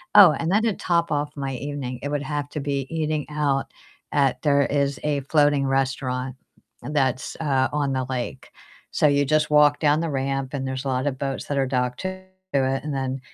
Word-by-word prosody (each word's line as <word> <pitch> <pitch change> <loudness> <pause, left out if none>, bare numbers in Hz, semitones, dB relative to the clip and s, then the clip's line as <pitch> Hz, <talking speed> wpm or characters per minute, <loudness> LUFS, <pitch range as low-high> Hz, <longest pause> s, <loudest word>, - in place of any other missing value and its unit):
Oh, 200 -6 +10
and 165 +4 -2
then 215 +3 +3
to 225 -3 +2
top 170 -3 0
off 145 0 0
my 135 -1 -3
evening, 130 -2 -5
it - - -1
would 145 -1 -1
have 145 -1 -3
to 150 - -4
be 140 -1 -2
eating 155 -2 -1
out 145 -2 0 0.4
at 135 -3 +2
there 140 -1 +4
is 140 -1 0
a 145 -2 0
floating 145 0 +3
restaurant 130 -1 -1 0.5
that's, 135 -3 -1
uh, 135 -4 +2
on 145 -2 0
the 130 -1 -1
lake. 130 +1 -4 0.4
So 150 - +3
you 145 0 +3
just 150 +1 +2
walk 150 -1 +5
down 150 0 +3
the 165 - -1
ramp 135 0 -2
and 135 -1 -2
there's 130 +1 -4
a - - -1
lot 130 +2 0
of 130 -2 -2
boats 135 -1 -3
that 145 - -2
are 135 -1 +2
docked 125 -1 -1
to 185 - -2 0.4
it, 135 -1 +1
and 150 -1 -3
then, 135 0 -2
140 Hz, 205 wpm, -24 LUFS, 135-150 Hz, 0.5 s, Oh